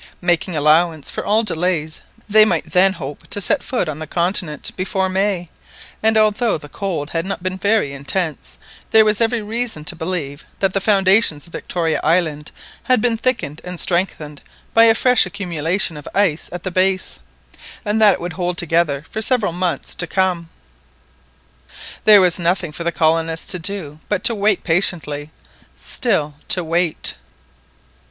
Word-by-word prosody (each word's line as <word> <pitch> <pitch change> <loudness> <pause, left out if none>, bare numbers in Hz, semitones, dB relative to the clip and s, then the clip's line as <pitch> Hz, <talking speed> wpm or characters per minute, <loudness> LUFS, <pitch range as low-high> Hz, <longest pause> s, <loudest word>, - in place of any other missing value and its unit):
Making 175 0 0
allowance 155 +1 +2
for - - -4
all 215 +2 +2
delays 165 -5 -1 0.3
they 215 +1 +6
might 180 -7 0
then 190 +1 +4
hope 145 -5 -8
to - - -3
set 195 - +1
foot 245 -9 -2
on 155 -1 -5
the 155 - -6
continent 170 -2 -1
before 190 0 -1
May, 190 -2 0 0.5
and 220 0 +3
although 215 0 +2
the 150 -1 -11
cold 165 -4 -4
had 165 -1 -1
not 190 -1 -5
been 185 0 -3
very 205 -8 +1
intense 140 - -3 0.3
there 220 -1 +6
was 215 +1 +1
every 230 -1 +1
reason 225 -7 -3
to 175 - 0
believe 160 -4 -4
that 190 -1 0
the 195 - 0
foundations 195 -6 +3
of 170 - -18
Victoria 165 -3 -2
Island 155 -2 0 0.3
had 255 -1 +3
been 230 +1 +2
thickened 225 - -2
and 180 -1 -7
strengthened 160 -5 -2 0.3
by 230 0 +7
a 225 -1 +6
fresh 250 0 +4
accumulation 175 -2 -2
of 150 - -10
ice 190 -6 +1
at 175 -1 -7
the 185 - -3
base, 185 - 0 0.7
and 210 +1 0
that 210 -2 +7
it - - -10
would 175 0 -5
hold 175 0 -2
together 165 -4 0
for 220 - -5
several 220 -6 +2
months 175 -4 -2
to 175 - -3
come. 180 -3 -1 1.6
There 210 -2 +8
was 180 -2 +3
then 175 - -4
nothing 175 -2 0
for 170 - -6
the 170 - 0
colonists 165 0 +1
to 185 - -2
do 165 -4 -3
but 205 -3 -1
to 235 - +2
wait 205 -2 +1
patiently,—still 160 - -2
to 180 - +2
wait! 165 0 -1
180 Hz, 165 wpm, -19 LUFS, 160-205 Hz, 1.6 s, There